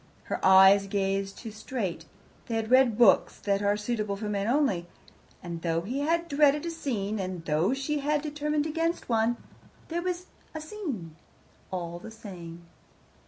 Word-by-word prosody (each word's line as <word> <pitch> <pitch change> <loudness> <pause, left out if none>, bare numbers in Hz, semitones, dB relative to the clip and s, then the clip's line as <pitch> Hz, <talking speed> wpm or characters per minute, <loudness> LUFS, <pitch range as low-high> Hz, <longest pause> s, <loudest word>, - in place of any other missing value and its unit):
Her - - -4
eyes 190 +1 +7
gazed 195 0 -1
too 225 - -7
straight; 210 -6 -4 0.4
they 230 - -2
had 225 +1 -2
read 255 -4 +5
books 235 -5 +5
that 200 -1 +1
are 205 0 +2
suitable 210 -2 -2
for 210 +1 -5
men 200 0 -1
only. 235 - +1 0.6
And 170 -2 -6
though 165 -1 0
he 245 +10 -3
had 335 +3 +1
dreaded 290 0 +3
a 335 - -2
scene, 220 -10 -2
and 185 -3 -4
though 165 - +2
she 290 +2 -2
had 295 +1 0
determined 300 0 -1
against 330 +1 -1
one, 230 +1 +2 0.5
there 340 +1 -1
was 360 0 -3 0.3
a - - -3
scene, 295 - -6 0.5
all 175 -2 -4
the 225 - -9
same. 175 -6 -10
220 Hz, 165 wpm, -28 LUFS, 190-290 Hz, 0.6 s, eyes